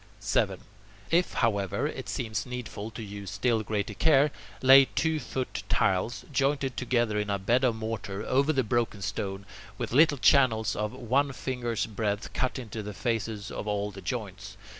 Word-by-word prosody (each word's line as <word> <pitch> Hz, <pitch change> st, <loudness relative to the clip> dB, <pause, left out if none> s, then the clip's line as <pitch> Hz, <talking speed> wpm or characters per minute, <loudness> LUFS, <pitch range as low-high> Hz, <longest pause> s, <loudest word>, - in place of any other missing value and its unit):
7. -, -, 0 dB, 0.5 s
If, 175 Hz, +2 st, +2 dB
however, 100 Hz, -5 st, 0 dB
it -, -, -4 dB
seems 110 Hz, 0 st, -3 dB
needful 125 Hz, -4 st, -5 dB
to 115 Hz, 0 st, -8 dB
use 100 Hz, -1 st, -7 dB
still 110 Hz, +3 st, +1 dB
greater 105 Hz, -1 st, -2 dB
care, 145 Hz, +4 st, +4 dB, 0.3 s
lay 135 Hz, +1 st, +9 dB
two 160 Hz, +3 st, 0 dB
foot 130 Hz, -1 st, -4 dB
tiles, 95 Hz, +5 st, +1 dB
jointed 135 Hz, -1 st, +1 dB
together 120 Hz, -4 st, +1 dB
in 105 Hz, 0 st, -2 dB
a 100 Hz, -, +1 dB
bed 115 Hz, +7 st, +1 dB
of 120 Hz, -3 st, +3 dB
mortar, 110 Hz, -2 st, -4 dB
over 140 Hz, +4 st, +2 dB
the 135 Hz, -4 st, +1 dB
broken 115 Hz, -3 st, -1 dB
stone, 100 Hz, 0 st, -3 dB, 0.3 s
with -, -, -4 dB
little 150 Hz, +1 st, +5 dB
channels 115 Hz, -5 st, +4 dB
of 105 Hz, 0 st, -2 dB
one 135 Hz, +4 st, 0 dB
finger's 120 Hz, 0 st, -2 dB
breadth 105 Hz, -1 st, -3 dB
cut 130 Hz, -, -1 dB
in 125 Hz, -4 st, -7 dB
the 105 Hz, -2 st, -5 dB
faces 110 Hz, -1 st, -2 dB
of -, -, -5 dB
all 105 Hz, 0 st, -1 dB
the 95 Hz, 0 st, -10 dB
joints. 105 Hz, -4 st, -5 dB
115 Hz, 165 wpm, -28 LUFS, 105-130 Hz, 0.5 s, lay